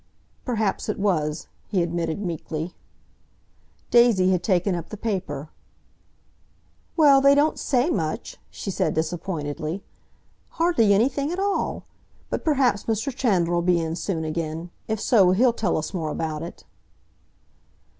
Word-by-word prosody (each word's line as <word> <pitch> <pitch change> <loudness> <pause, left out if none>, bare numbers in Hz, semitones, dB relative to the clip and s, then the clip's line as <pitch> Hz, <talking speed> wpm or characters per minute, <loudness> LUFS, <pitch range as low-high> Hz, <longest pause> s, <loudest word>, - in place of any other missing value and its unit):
"Perhaps 220 -5 -1
it 215 - -1
was," 160 -6 0 0.2
he 185 -4 +1
admitted 170 0 -2
meekly. 165 0 -4 1.2
Daisy 230 -6 +5
had 180 -2 +1
taken 185 0 +1
up 170 -2 -4
the 215 - -7
paper. 175 -9 -3 1.5
"Well, 285 -4 +6
they 280 +1 +6
don't 295 +2 +2
say 265 +4 +1
much," 155 - -3
she 195 - -5
said - - 0
disappointedly. 160 0 -3 0.7
"Hardly 330 -11 +3
anything 265 +8 +2
at 355 - -3
all! 400 +1 -1 0.5
But - - -2
perhaps 260 -9 +2
Mr. 225 +4 -1
Chandler 180 -10 +1
'll - - +2
be 175 0 +3
in 165 0 -2
soon 165 -1 -2
again. 160 +1 -4 0.2
If 220 -1 -1
so, 195 -6 +4
he'll 240 +5 +4
tell 210 -6 0
us 155 +4 -4
more 165 -4 -2
about 155 0 -3
it." 170 - -8
185 Hz, 135 wpm, -24 LUFS, 165-235 Hz, 1.5 s, Well